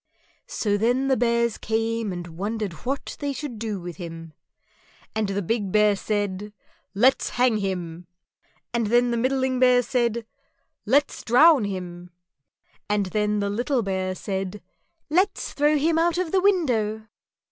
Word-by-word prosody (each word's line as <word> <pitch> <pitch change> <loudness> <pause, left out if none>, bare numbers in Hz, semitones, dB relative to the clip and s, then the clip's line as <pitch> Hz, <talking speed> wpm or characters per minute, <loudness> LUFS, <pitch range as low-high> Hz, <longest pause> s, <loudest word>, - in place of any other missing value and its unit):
_" - - -33
So 205 - 0
then 245 +5 +1
the 265 - +4
Bears 235 -1 +1
came 225 -1 -1
and 175 -1 -5
wondered 205 +1 -3
what 275 +1 -3
they 285 -1 -2
should 260 -4 -6
do 215 -3 -3
with 175 -1 -8
him; 165 -3 -8 0.8
and 220 -1 0
the 200 0 -2
big 205 0 -1
Bear 210 0 +4
said, 205 0 -3 0.4
"Let's 250 +6 +3
hang 245 -3 +3
him!" 180 -4 -4 0.7
and 235 -2 0
then 240 +2 +3
the 235 - 0
middling 260 +1 0
Bear 250 -1 +5
said, 235 -1 0 0.6
"Let's 280 +5 +2
drown 275 +1 +6
him!" 180 -2 -6 0.8
and 205 -1 +1
then 210 -1 +1
the 200 - -1
little 245 +3 0
Bear 190 -1 -2
said, 195 +1 -4 0.4
"Let's 375 +6 0
throw 295 +1 +3
him 320 +3 +2
out 340 0 +2
of 360 -3 -1
the 380 - +3
window." 240 - +1
225 Hz, 150 wpm, -24 LUFS, 200-255 Hz, 0.8 s, drown